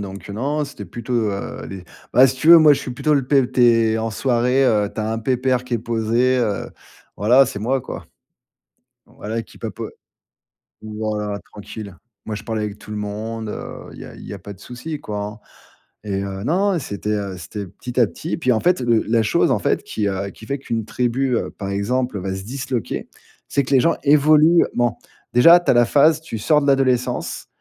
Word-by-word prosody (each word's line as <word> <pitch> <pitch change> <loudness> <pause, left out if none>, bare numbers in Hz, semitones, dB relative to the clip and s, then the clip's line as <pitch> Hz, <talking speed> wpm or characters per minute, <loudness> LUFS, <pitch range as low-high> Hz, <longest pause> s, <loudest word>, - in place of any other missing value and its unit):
donc, 100 0 -8
heu, - - -5
non, 145 +8 -1
c'était 105 -9 -9
plutôt, 120 +6 -7 0.2
heu, 100 - -5
les 95 -2 -8 0.3
bah 130 +2 +7
si 130 0 -2
tu 155 +5 -1
veux, 170 - +11
moi, 155 -2 +7
je 140 - +1
suis 130 - -6
plutôt 150 +5 0
le 135 -3 0
p 135 -2 +3
tu 125 - +1
es 115 -2 +4
en 115 0 -2
soirée, 125 +3 +1
heu, 105 -4 +2
tu - - -11
as 110 +1 -2
un 115 - -2
pépère 125 +1 0
qui 125 - -3
est - - 0
posé, 115 +3 +1
heu. 110 -5 -1 0.5
Voilà, 120 +7 +5
c'est 100 - -5
moi, 130 +5 0
quoi. - - -8 1.0
Voilà 115 +2 -5
qui, - - -17
papo - - -6 0.9
voilà, 105 -1 -3 0.2
tranquille. 105 -1 -9 0.3
Moi, 110 - -4
je 105 - -7
parle 110 -1 -3
avec 105 -1 -4
tout - - -14
le 105 - -4
monde, 110 +2 -5
heu, - - -7
il - - -12
y - - -8
a - - -12
il - - -11
y - - -7
a 100 - -8
pas 100 +3 -9
de 95 - -19
souci, 145 +5 -7
quoi, 105 -6 -5
hein. 105 +1 -7 0.7
Et 100 -2 -2
heu, 95 0 -5
non, 195 +8 +2
non, - - 0
c'était, 105 -5 -4
heu, 100 -3 -2
c'était 100 +3 -7
petit 125 +7 -7
à 120 - +6
petit. 160 - -7
Et - - +1
puis 130 -6 +1
en 110 - +1
fait, 180 -2 +2
le 120 -2 +2
la 115 0 +3
chose, - - +2
en - - +2
fait, - - 0
qui, 105 -2 -3
heu, 100 +1 -3
qui 110 - -14
fait 140 0 -2
qu'une 115 -4 -3
tribu, 125 +3 0
heu, - - -2
par 100 -1 -7
exemple, 110 +3 -1
va 95 +1 -3
se 95 - -6
disloquer. 125 0 -4 0.4
C'est 140 - +1
que 130 - -6
les 130 - +6
gens 165 - +2
évoluent. 155 +3 +5
Ment. 120 -2 0 0.3
Déjà, 165 +9 +8
tu - - 0
as - - +4
la 120 0 +5
phase, 150 +5 +4
tu 160 -8 -6
sors 150 +8 +3
de 140 - -2
l'adolescence, 130 -3 0
120 Hz, 225 wpm, -21 LUFS, 105-135 Hz, 1.0 s, veux